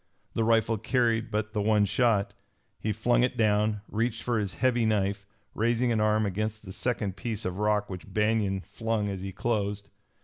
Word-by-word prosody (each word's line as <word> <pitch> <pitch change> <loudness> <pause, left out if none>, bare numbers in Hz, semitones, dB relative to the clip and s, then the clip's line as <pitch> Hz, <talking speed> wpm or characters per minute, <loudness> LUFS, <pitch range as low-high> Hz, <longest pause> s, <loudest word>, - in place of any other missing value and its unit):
The 115 - +1
rifle 115 -1 +2
carried 115 0 +1
but 110 +1 -2
the 105 - 0
one 105 0 +3
shot. 105 -1 +2 0.5
He 110 - -1
flung 120 +3 +2
it 125 - +1
down, 105 -1 +2
reached 115 +1 -1
for 120 -2 0
his 100 -3 -3
heavy 125 -1 +2
knife, 100 -2 0 0.3
raising 120 +2 +1
an 110 -2 +1
arm 110 0 +3
against 110 +2 -3
the 95 - -8
second 105 -3 -2
piece 110 +2 -4
of 90 +1 -3
rock 105 -1 +1
which 95 0 -8
Banion 105 -2 +1
flung 110 0 -2
as 95 -2 -4
he 95 0 -5
closed. 100 -2 -2
110 Hz, 180 wpm, -28 LUFS, 100-115 Hz, 0.5 s, one